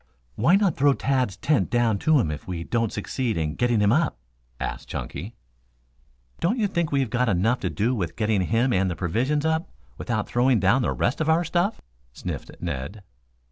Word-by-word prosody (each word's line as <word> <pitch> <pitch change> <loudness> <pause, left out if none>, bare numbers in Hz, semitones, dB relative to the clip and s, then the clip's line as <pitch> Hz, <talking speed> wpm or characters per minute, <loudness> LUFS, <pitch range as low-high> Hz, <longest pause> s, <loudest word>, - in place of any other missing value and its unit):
"Why 150 - +3
not 195 -4 +2
throw 140 +1 +4
Tad's 130 -9 0
tent 150 -2 +1
down 115 -4 +2
to 155 0 +3
him 80 - 0
if 75 - -7
we 85 -2 -4
don't 115 +3 -1
succeed 115 +2 -2
in 75 -2 -1
getting 120 0 +1
him 105 0 +4
up?" 155 +4 +1 0.4
asked - - -4
Chunky. 95 +12 -6 1.0
"Don't 200 +9 +1
you 220 - +1
think 170 -5 -1
we've 135 -5 0
got 125 -1 +1
enough 110 +6 +2
to - - -2
do 115 +5 0
with 90 -9 -3
getting 105 -3 +1
him 115 +6 +1
and 95 -1 +2
the 85 - -3
provisions 130 - 0
up, 160 0 0 0.3
without - - -1
throwing 125 -1 +3
down 100 +8 +3
the - - 0
rest 125 - -1
of 160 - 0
our 165 +2 +4
stuff?" 175 +5 0 0.3
sniffed - - -6
Ned. 85 +5 -5
120 Hz, 190 wpm, -25 LUFS, 100-145 Hz, 1.0 s, throw